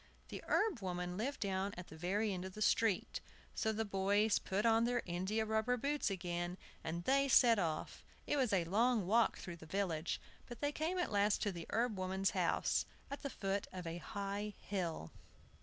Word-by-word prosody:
The - - -6
herb 415 - +2
woman 180 -2 -3
lived 255 +8 -2
down 195 0 -1
at 175 - -8
the - - -10
very 195 +6 0
end 180 -1 -4
of 190 0 -7
the 215 - -7
street; 215 -2 +2 0.3
so 220 - 0
the 220 +1 -1
boys 205 +2 +2
put 200 +4 -1
on 225 0 +5
their 245 0 +1
india 190 +5 -1
rubber 220 +3 +1
boots 285 +2 0
again, 175 -1 -3 0.3
and 170 +2 -3
they 275 +6 +3
set 235 -4 +6
off. 160 -4 -2 0.2
It - - +1
was 260 -5 +2
a 185 -4 +2
long 220 +3 +2
walk 225 +4 +3
through 175 -2 -7
the 160 - -12
village, 170 -2 -1 0.3
but 240 -2 -8
they 290 0 0
came 320 +5 -1
at 355 - 0
last 205 0 +3
to 205 - +1
the 170 -3 -7
herb 225 -3 0
woman's 190 +1 0
house, - - +1 0.2
at 280 - -5
the 280 - -3
foot 195 -4 -2
of 185 -2 -6
a 165 +1 -4
high 200 +1 -4
hill. 180 -5 -3
200 Hz, 195 wpm, -37 LUFS, 180-230 Hz, 0.3 s, set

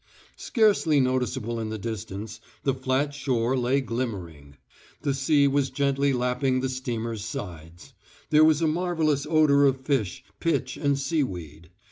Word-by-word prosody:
Scarcely 205 - +3
noticeable 125 -2 -1
in 110 -1 -3
the 110 - -4
distance, 110 0 -6 0.2
the 135 - +2
flat 130 +2 -1
shore 130 -3 0
lay 130 +2 +1
glimmering. 95 - -5 0.5
The 140 -2 +1
sea 140 +1 +3
was 140 -1 +1
gently 140 0 +1
lapping 125 +1 0
the 130 - -1
steamer's 115 -4 -4
sides. 85 -5 -8 0.4
There 155 0 +6
was 155 0 +4
a - - +3
marvellous 155 -4 0
odour 150 -3 +5
of 135 -1 +2
fish, 130 - -1 0.2
pitch 165 -1 -1
and 140 -2 0
seaweed. 90 - -3
130 Hz, 140 wpm, -26 LUFS, 110-145 Hz, 0.5 s, There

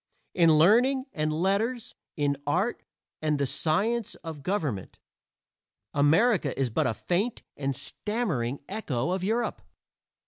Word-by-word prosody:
In 165 -3 +5
learning 245 - +4
and 155 0 0
letters, 200 +9 0 0.2
in 145 -1 +1
art 185 +10 0 0.4
and 155 -1 +1
the 140 - +1
science 210 - 0
of 160 -3 -7
government, 145 - -2 1.0
America 155 - +3
is 130 -3 +1
but 145 +4 +1
a 115 - -1
faint 200 +7 -1
and 135 -1 -2
stammering 155 - -2
echo 165 - -2
of 185 0 -1
Europe. 225 +5 -1
165 Hz, 125 wpm, -27 LUFS, 145-215 Hz, 1.0 s, In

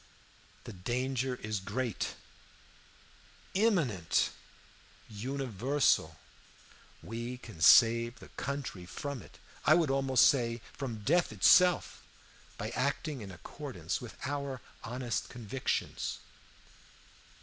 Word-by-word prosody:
The 115 - -8
danger 125 +6 -1
is 110 -1 -2
great, 110 +4 -3 1.4
imminent, 165 - +2 0.8
universal. 125 - 0 0.9
We 120 +3 -5
can 110 -9 -12
save 115 +7 +6
the - - -13
country 135 -10 -5
from 140 +4 -5
it, - - -15 0.3
I - - +6
would 160 -5 +2
almost 135 -2 +4
say 120 -3 +2
from, 115 -7 -5
death 170 - +3
itself, 175 - +4 0.6
by - - -4
acting 145 -5 -1
in 100 - -7
accordance 90 -2 -5
with - - -9
our 140 -2 -3 0.2
honest 120 +1 -3
convictions. 120 +2 -3
125 Hz, 95 wpm, -32 LUFS, 110-135 Hz, 1.4 s, save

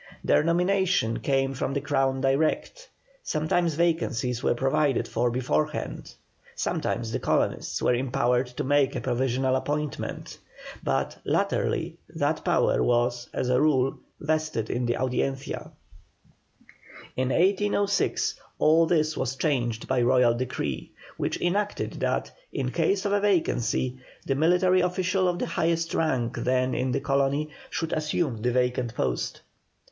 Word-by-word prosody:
Their - - +3
nomination 180 - +1
came 135 -1 +1
from 135 +1 -2
the - - +2
Crown 135 -1 0
direct; 155 - 0 0.3
sometimes 165 - 0
vacancies 140 -8 0
were - - +2
provided 135 +1 +1
for 120 +2 0
beforehand, 130 +5 -2 0.4
sometimes 115 -1 -2
the - - -1
colonists - - 0
were - - +4
empowered 125 0 +1
to 125 - -5
make 140 0 +2
a - - -1
provisional 130 +1 0
appointment; 150 +2 -3 0.4
but, 65 0 -1
latterly, - - 0 0.2
that - - 0
power - - +2
was, 120 0 +1
as 125 - -2
a 125 +1 +3
rule, 135 -3 +2 0.2
vested 155 -7 -1
in 120 0 -1
the 120 - +1
Audiencia. 135 +1 -2 1.5
In 130 0 0
1806 200 +4 +1 0.2
all 160 +2 +4
this 155 -2 +2
was 130 0 -2
changed 120 -6 -1
by 130 -1 +1
Royal 125 -1 +4
decree, 120 - -3 0.3
which - - -2
enacted 200 +4 -1
that, - - -1 0.2
in - - -2
case 395 - +1
of 200 - +1
a 205 - +3
vacancy, 130 - +1 0.3
the 135 - +1
military 180 +5 +3
official 180 +1 +1
of 175 -1 0
the - - -1
highest 165 0 0
rank 125 -7 0
then 130 +1 +1
in 130 0 0
the 125 - 0
colony 140 +2 0 0.2
should 165 - -3
assume 150 -6 -1
the 125 +2 +1
vacant 125 -1 0
post. 60 - -2
135 Hz, 135 wpm, -26 LUFS, 125-165 Hz, 1.5 s, were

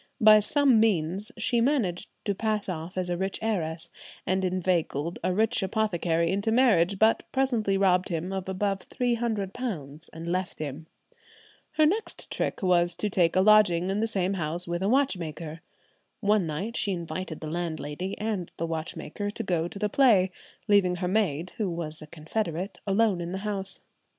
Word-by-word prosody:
By 215 -2 +8
some 265 +2 +3
means 195 -1 +1
she 235 +1 +1
managed 230 - 0 0.2
to 200 - +1
pass 215 +1 -1
off 175 0 -5
as 180 -1 -1
a 175 - -1
rich 190 +1 -2
heiress, 165 -7 -2 0.3
and 190 +1 0
inveigled 175 -3 -1
a - - +1
rich 220 +5 +2
apothecary 175 -5 0
into 200 +3 0
marriage, 205 -7 +4
but 220 +3 +4
presently 235 -7 +1
robbed 185 -1 +3
him 175 +2 -3
of 190 -1 -4
above 195 +1 -1
£300 220 - -2
and 165 +1 -8
left 185 +1 -2
him. 155 +1 -6 0.9
Her 310 0 +4
next 420 +9 -1
trick - - -2
was 175 -1 +3
to 210 +3 -2
take 175 -3 +2
a 185 - +5
lodging 190 -4 +5
in 200 - -1
the 225 - +1
same 195 -3 0
house 170 0 0
with 175 +1 -2
a 195 - +1
watchmaker. 170 - -1 0.6
One 205 -4 +2
night 190 +10 -4
she 200 - 0
invited 170 -1 -5
the 155 -1 -6
landlady 170 +1 -4
and 210 -5 -3
the 165 - -1
watchmaker 165 +5 -4
to 220 +2 -4
go 175 -4 0
to 185 - -9
the 210 - 0
play, 205 -6 +4 0.4
leaving 200 -4 +4
her 180 0 -2
maid, 180 -4 0
who 210 -5 0
was 160 -2 -4
a 155 - -9
confederate, 175 +3 -4
alone 200 -2 +2
in 170 +1 -4
the - - -2
house. 195 -2 -2
190 Hz, 170 wpm, -27 LUFS, 170-215 Hz, 0.9 s, By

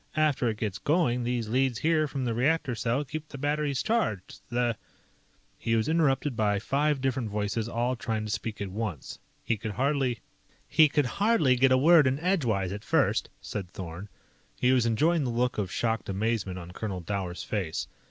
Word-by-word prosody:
After 150 -6 +2
it 110 - -3
gets 105 -3 -3
going, 125 - +1
these 120 -2 -1
leads 130 +1 +1
here 155 +1 +2
from 135 -2 -3
the 115 - 0
reactor 140 +3 +1
cell 120 +5 -1
keep 155 +2 -6
the 140 - -8
batteries 145 -1 0
charged. 215 - -1
The 120 -1 0 0.4
" - - -37
He 115 - 0
was 110 0 +1
interrupted 145 -4 +1
by 105 -2 +1
five 140 +6 0
different 130 -4 -1
voices 105 +2 -2
all 120 +2 0
trying 110 -2 -3
to 105 - -4
speak 110 0 -3
at 100 -2 -3
once. 100 - -5 0.2
He 115 - 0
could 110 0 -5
hardly 135 -1 0 0.3
"... - - -34
He 155 -1 +5
could 145 -1 +2 0.2
hardly 205 - +4
get 130 +1 +4
a 130 - +6
word 155 +1 +6
in 130 +1 +1
edgewise 120 - 0
at 105 +1 -6
first," - - +1
said 95 -4 -5
Thorn. 90 +2 -8 0.5
He 125 - +3
was 125 -3 +3
enjoying 155 +8 +2
the 130 - -1
look 120 0 0
of 95 -3 -2
shocked 115 -3 -1
amazement 100 -1 -1
on 90 -1 -8
Colonel 95 -1 -4
Dower's 90 -1 -4
face. 80 - -3
120 Hz, 190 wpm, -28 LUFS, 105-140 Hz, 0.5 s, a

